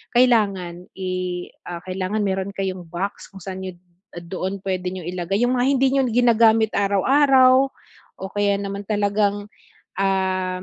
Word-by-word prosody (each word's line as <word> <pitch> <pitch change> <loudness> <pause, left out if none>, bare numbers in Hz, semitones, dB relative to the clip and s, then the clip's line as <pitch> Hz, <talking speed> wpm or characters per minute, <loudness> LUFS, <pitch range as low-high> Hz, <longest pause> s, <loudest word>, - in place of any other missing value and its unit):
kailangan, 200 -8 +2
i 190 -1 -4 0.6
ah, 175 -1 -6
kailangan 190 +3 -2
mayro'n 195 0 -2
kayong 185 -3 -4
box 180 +4 -5
kung 195 -1 -13
saan 190 0 -6
nyo 185 - -6 0.5
doon 185 +3 -5
puwede 185 -2 -3
niyo 185 - -6
ilagay 180 +3 -2
yung 245 +1 +2
mga 245 - +2
hindi 270 -1 +3
nyo 275 -1 +3
ginagamit 225 -2 +4
araw-araw, 260 +6 +4 0.6
o 190 - -5
kaya 205 -1 +1
naman 200 0 -5
talagang, 205 0 0 0.5
uhm, 185 -1 0
200 Hz, 140 wpm, -22 LUFS, 185-220 Hz, 0.6 s, ginagamit